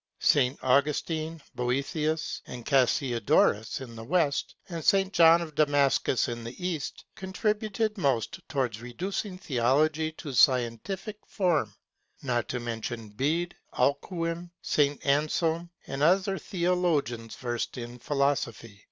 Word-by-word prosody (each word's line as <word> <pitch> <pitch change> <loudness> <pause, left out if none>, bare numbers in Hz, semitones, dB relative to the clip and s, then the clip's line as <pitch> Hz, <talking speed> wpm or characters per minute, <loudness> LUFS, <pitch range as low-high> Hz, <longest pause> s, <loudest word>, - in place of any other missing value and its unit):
St. 135 -1 +3
Augustine, 155 +4 +1
Boethius 140 +5 -1
and 120 -2 -8
Cassiodorus 120 -4 +2
in 120 -3 -9
the 115 - -8
West, 150 +1 0
and 170 -3 -5
St. 195 +2 +3
John 170 -1 +6
of 155 -2 -9
Damascus 145 -4 +2
in 120 -1 -5
the 130 +10 -5
East 155 -5 -5
contributed 210 +2 -1
most 135 -8 0
towards 125 -7 -1
reducing 185 - -4
theology 150 +3 +1
to 145 -3 -7
scientific 130 - +2
form, 180 -6 0 0.5
not 120 -3 -1
to 125 - -2
mention 115 -1 -5
Bede, 155 +11 -1 0.2
Alcuin, 165 +5 0
St. 145 -1 +1
Anselm 160 +4 +1 0.2
and 135 - -5
some 150 - +6
other 195 +1 +1
theologians 170 - 0
versed 120 0 -3
in 120 0 -7
philosophy. 125 -6 -1
145 Hz, 120 wpm, -28 LUFS, 125-170 Hz, 0.5 s, John